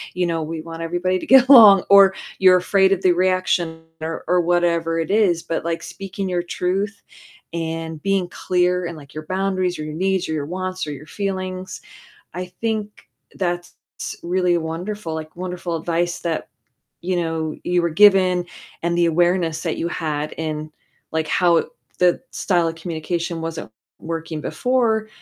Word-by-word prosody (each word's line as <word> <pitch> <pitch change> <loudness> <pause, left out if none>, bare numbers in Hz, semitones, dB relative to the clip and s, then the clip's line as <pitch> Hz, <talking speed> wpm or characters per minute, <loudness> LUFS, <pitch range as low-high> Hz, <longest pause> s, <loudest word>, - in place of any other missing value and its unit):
you 180 0 +1
know, 165 -1 -1
we 160 +1 -5
want 165 0 -8
everybody 175 +2 -1
to - - -8
get 265 -1 +7
along, 210 -8 +9
or 195 -1 +8 0.3
you're 185 -1 +7
afraid 190 +1 +3
of 190 - -2
the 185 - +5
reaction, 175 -2 0 0.2
or 160 0 -4
or 180 0 +3
whatever 170 -1 +1
it 165 +2 -2
is, 195 -6 +3
but, 165 - -3
like, 165 0 -2
speaking 195 0 -6
your 175 -1 -1
truth, 195 +3 -2 0.5
and 165 -1 -4
being 195 -2 +1
clear 180 0 0
in, 170 0 -5
like, 140 -3 -13
your 155 0 -7
boundaries, 185 -1 -1
or 155 - -3
your 155 - -6
needs, 190 +2 0
or 160 - -1
your 150 -2 -2
wants 185 0 -4
or - - -4
your 145 +2 -10
feelings, 185 -1 -4 0.5
I 180 0 -4
think 215 -2 -3 0.3
that's 175 -2 -3 0.5
really 180 0 +1
wonderful, 165 +3 -4
like, 155 0 -7
wonderful 180 -1 -4
advice 170 +1 -1
that, 165 -2 -3 0.5
you 180 +1 -1
know, 160 -2 -2
you 180 0 +1
were 170 - +1
given, 185 -1 +5 0.4
and 170 0 0
the 175 - +4
awareness 175 -1 +1
that - - -2
you 170 - -2
had 155 -3 -3
in, 155 -1 -4 0.4
like, 160 -1 -1
how 170 -1 +3 0.3
the 180 -1 +4
style 175 -4 +1
of 165 - -2
communication 165 0 -3
wasn't 165 -7 -5 0.3
working 165 -1 -5
before 230 0 0
175 Hz, 165 wpm, -21 LUFS, 165-185 Hz, 0.5 s, along